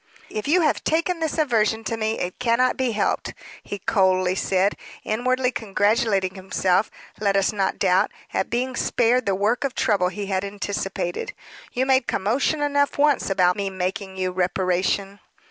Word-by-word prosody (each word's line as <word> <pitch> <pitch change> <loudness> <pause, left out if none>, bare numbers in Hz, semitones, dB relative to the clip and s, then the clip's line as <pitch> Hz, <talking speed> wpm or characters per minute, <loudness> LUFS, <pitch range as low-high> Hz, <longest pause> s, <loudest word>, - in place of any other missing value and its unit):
"If 215 +4 -4
you 350 +5 +4
have 305 -3 +1
taken 335 +2 0
this 320 0 -2
aversion 225 -7 +1
to 230 - -2
me, 220 0 -1
it 180 0 -4
cannot 250 +1 +2
be 255 -3 -1
helped," 210 - -1 0.3
he 205 - -6
coldly 185 -2 +2
said, 190 +1 +1 0.3
inwardly 250 +3 0
congratulating 205 -3 +1
himself, 190 +1 0 0.3
let 200 -2 +1
us 195 +1 +2
not 195 -2 -1
doubt, 185 -1 +3 0.2
at - - -1
being 250 +2 -1
spared 245 0 +1
the 195 - +2
work 210 +7 0
of 275 -2 -2
trouble 195 -4 +2
he 200 +3 -4
had 190 -1 -1
anticipated. 200 - -3 0.4
"You 255 +2 +1
made 265 -2 +3
commotion 255 +9 0
enough 285 -1 +1
once 290 -4 +2
about 180 -2 +3
me 200 -1 -2
making 190 +1 -4
you 185 -1 -1
reparation." 185 +2 0
205 Hz, 165 wpm, -23 LUFS, 190-250 Hz, 0.4 s, you